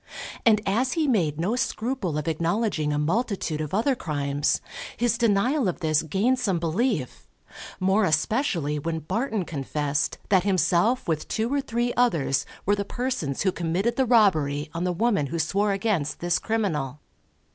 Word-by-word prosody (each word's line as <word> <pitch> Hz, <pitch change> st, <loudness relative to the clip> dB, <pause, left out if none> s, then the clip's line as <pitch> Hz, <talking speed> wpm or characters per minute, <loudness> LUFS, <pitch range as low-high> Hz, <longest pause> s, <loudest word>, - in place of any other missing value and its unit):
And 215 Hz, -2 st, +5 dB
as 235 Hz, +7 st, +1 dB
he 320 Hz, -3 st, +1 dB
made 165 Hz, -, +1 dB
no 195 Hz, +8 st, 0 dB
scruple 240 Hz, -, -2 dB
of 150 Hz, -, -3 dB
acknowledging 165 Hz, 0 st, 0 dB
a 145 Hz, -, 0 dB
multitude 170 Hz, -1 st, -1 dB
of 155 Hz, -1 st, -4 dB
other 230 Hz, +8 st, +2 dB
crimes, 145 Hz, -, -1 dB, 0.4 s
his 240 Hz, 0 st, +2 dB
denial 235 Hz, +4 st, +2 dB
of 175 Hz, -1 st, -3 dB
this 155 Hz, -2 st, +2 dB
gained 205 Hz, -, +1 dB
some 195 Hz, -8 st, 0 dB
belief, 170 Hz, -, -1 dB, 0.5 s
more 190 Hz, +3 st, +3 dB
especially 160 Hz, -, 0 dB
when 160 Hz, +2 st, -3 dB
Barton 220 Hz, -, -2 dB
confessed 145 Hz, -1 st, -2 dB
that 190 Hz, -2 st, +5 dB
himself 190 Hz, -, +2 dB
with 160 Hz, -2 st, -1 dB
two 225 Hz, +4 st, -1 dB
or 285 Hz, -, +1 dB
three 240 Hz, -1 st, -1 dB
others 165 Hz, -, +1 dB, 0.2 s
were 205 Hz, -, +3 dB
the 200 Hz, -, -2 dB
persons 200 Hz, -, -2 dB
who 190 Hz, -, +2 dB
committed 180 Hz, +8 st, -1 dB
the 265 Hz, -1 st, +1 dB
robbery 155 Hz, -, +3 dB
on 170 Hz, +1 st, -2 dB
the 180 Hz, -, +1 dB
woman 195 Hz, -5 st, +1 dB
who 165 Hz, -, -4 dB
swore 200 Hz, +6 st, +1 dB
against 195 Hz, -7 st, -1 dB
this 175 Hz, 0 st, +1 dB
criminal. 155 Hz, -, -2 dB
190 Hz, 160 wpm, -25 LUFS, 155-230 Hz, 0.5 s, And